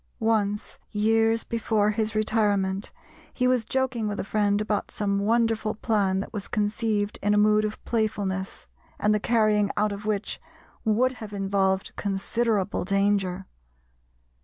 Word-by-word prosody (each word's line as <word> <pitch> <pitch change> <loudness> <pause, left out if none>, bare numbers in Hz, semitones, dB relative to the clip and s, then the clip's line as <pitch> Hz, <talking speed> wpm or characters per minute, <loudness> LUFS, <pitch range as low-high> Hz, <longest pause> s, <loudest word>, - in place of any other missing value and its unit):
Once, 210 -2 0
years 225 +1 +2
before 220 -2 +1
his 220 0 -1
retirement, 205 -3 +1 0.4
he 250 - 0
was 250 -3 +2
joking 260 -3 -1
with 205 -1 -3
a - - -1
friend 205 0 +1
about 210 -1 -1
some 200 -1 -1
wonderful 225 0 +1
plan 200 -4 +1
that 195 - -6
was 205 -2 -4
conceived 210 0 -1
in 205 +1 +2
a - - +3
mood 210 0 +4
of 215 0 -3
playfulness, 200 -4 -2 0.3
and 210 0 +3
the 210 - +2
carrying 215 -2 +2
out 210 0 +2
of 200 +1 -6
which 210 -1 -2 0.4
would 235 +4 +2
have 210 -1 -7
involved 195 -1 0
considerable 205 +1 0
danger. 195 -1 +1
210 Hz, 140 wpm, -26 LUFS, 200-220 Hz, 0.4 s, mood